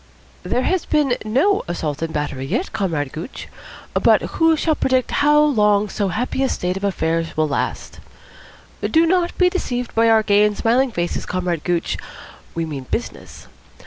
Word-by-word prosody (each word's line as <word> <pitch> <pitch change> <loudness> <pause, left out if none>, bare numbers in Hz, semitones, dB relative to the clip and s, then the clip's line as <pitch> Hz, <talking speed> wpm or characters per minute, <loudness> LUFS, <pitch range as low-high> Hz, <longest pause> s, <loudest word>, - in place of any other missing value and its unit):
"There 250 - -1
has 375 -2 0
been 290 -5 +2
no 275 - +2
assault 155 -4 -3
and 165 -1 -2
battery 145 -3 -3
yet, - - -2
Comrade 165 -10 -2
Gooch, 165 +11 -7 0.5
but - - +4
who 325 -1 +2
shall 315 +1 +1
predict 260 -3 0
how 295 +1 +5
long 210 -8 +3
so 200 +1 -1
happy 240 +8 -2
a 265 - +2
state 180 +1 -2
of 200 -1 +1
things 165 0 -1
will 155 0 +2
last? 140 - -3 0.8
Do 325 +1 +3
not 350 0 +1
be 365 - +4
deceived 250 -10 -2
by 230 0 +3
our 220 -1 +4
gay 205 -1 +4
and 210 -1 +1
smiling 245 +3 +2
faces, 175 -4 -3
Comrade 180 -3 -2
Gooch. 175 -2 -1 0.6
We 165 0 -1
mean 140 -5 -6
business. 240 - -5
210 Hz, 170 wpm, -20 LUFS, 165-270 Hz, 0.8 s, how